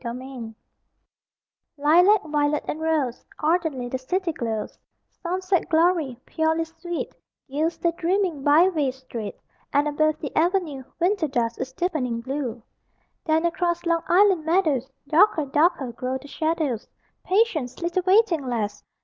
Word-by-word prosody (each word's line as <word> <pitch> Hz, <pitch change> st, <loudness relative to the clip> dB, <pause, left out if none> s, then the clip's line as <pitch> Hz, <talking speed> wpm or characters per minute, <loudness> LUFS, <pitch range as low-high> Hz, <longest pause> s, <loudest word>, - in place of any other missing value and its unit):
THE 235 Hz, -, -4 dB
5:42 245 Hz, -2 st, -7 dB, 1.2 s
Lilac, 350 Hz, +8 st, +5 dB
violet, 295 Hz, 0 st, +1 dB
and 310 Hz, -, -3 dB
rose 305 Hz, -7 st, 0 dB
Ardently 310 Hz, -6 st, 0 dB
the 260 Hz, +1 st, -3 dB
city 360 Hz, +7 st, -1 dB
glows; 225 Hz, -7 st, -4 dB, 0.4 s
Sunset 370 Hz, +1 st, -1 dB
glory, 320 Hz, -6 st, +2 dB
purely 320 Hz, +1 st, 0 dB
sweet, 330 Hz, +1 st, -6 dB, 0.3 s
Gilds 310 Hz, +5 st, -1 dB
the 340 Hz, -, +1 dB
dreaming 345 Hz, -3 st, -1 dB
byway 305 Hz, 0 st, +4 dB
street, 255 Hz, -5 st, -7 dB, 0.4 s
And, 285 Hz, +1 st, +2 dB
above 310 Hz, +1 st, +1 dB
the 290 Hz, -3 st, -6 dB
Avenue, 335 Hz, -4 st, +1 dB, 0.2 s
Winter 360 Hz, -1 st, +2 dB
dusk 235 Hz, -4 st, -1 dB
is 260 Hz, 0 st, -4 dB
deepening 265 Hz, -9 st, -1 dB
blue. 255 Hz, -3 st, -4 dB, 0.6 s
(Then, 320 Hz, +1 st, +2 dB
across 345 Hz, 0 st, 0 dB
Long 335 Hz, -1 st, +2 dB
Island 375 Hz, -2 st, +4 dB
meadows, 310 Hz, -6 st, +1 dB, 0.2 s
Darker, 315 Hz, 0 st, +4 dB
darker, 285 Hz, -2 st, +1 dB
grow 255 Hz, +2 st, -3 dB
the 275 Hz, +2 st, -13 dB
shadows: 315 Hz, -7 st, -1 dB, 0.4 s
Patience, 370 Hz, -, +1 dB
little 345 Hz, +2 st, 0 dB
waiting 375 Hz, -5 st, +3 dB
lass! 210 Hz, -4 st, -2 dB
310 Hz, 130 wpm, -24 LUFS, 265-345 Hz, 1.2 s, Lilac